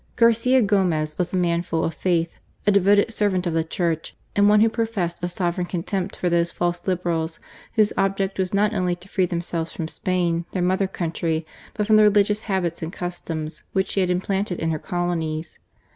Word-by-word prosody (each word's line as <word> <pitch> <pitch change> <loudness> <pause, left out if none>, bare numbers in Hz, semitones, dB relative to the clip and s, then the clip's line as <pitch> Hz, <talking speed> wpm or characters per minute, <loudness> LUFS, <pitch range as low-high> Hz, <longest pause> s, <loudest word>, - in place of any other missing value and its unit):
Garcia 235 +2 +4
Gomez 175 -7 +1
was 180 - 0
a - - -2
man 170 -2 +1
full 165 -2 -2
of 165 - -1
faith, 170 +1 -1 0.3
a 205 - +5
devoted 200 +2 +4
servant 195 -4 +1
of 170 - -1
the 165 0 +1
Church, 165 -1 -2 0.2
and 205 0 +5
one 210 0 +5
who 225 - +6
professed 220 -7 -2
a - - +1
sovereign 175 0 -1
contempt 185 +2 -3
for 180 - -2
those 170 0 +2
false 175 0 -1
Liberals 170 -3 -1 0.4
whose 215 -2 +4
object 195 0 0
was 185 -1 +1
not 210 +2 +2
only 180 -3 0
to 175 +2 -15
free 190 -2 +1
themselves 170 -1 -2
from 160 - -4
Spain, 170 -1 0
their 185 - 0
mother 190 +2 +2
country, 165 -3 -2 0.3
but 210 - 0
from 215 0 +5
the 215 - +7
religious 210 0 +4
habits 175 -4 -1
and 160 0 -4
customs 165 -4 -5
which 190 0 +1
she - - -1
had 185 -1 +2
implanted 190 +1 -1
in 165 0 -1
her 155 - -2
colonies. 165 -3 -3
180 Hz, 195 wpm, -23 LUFS, 170-200 Hz, 0.4 s, the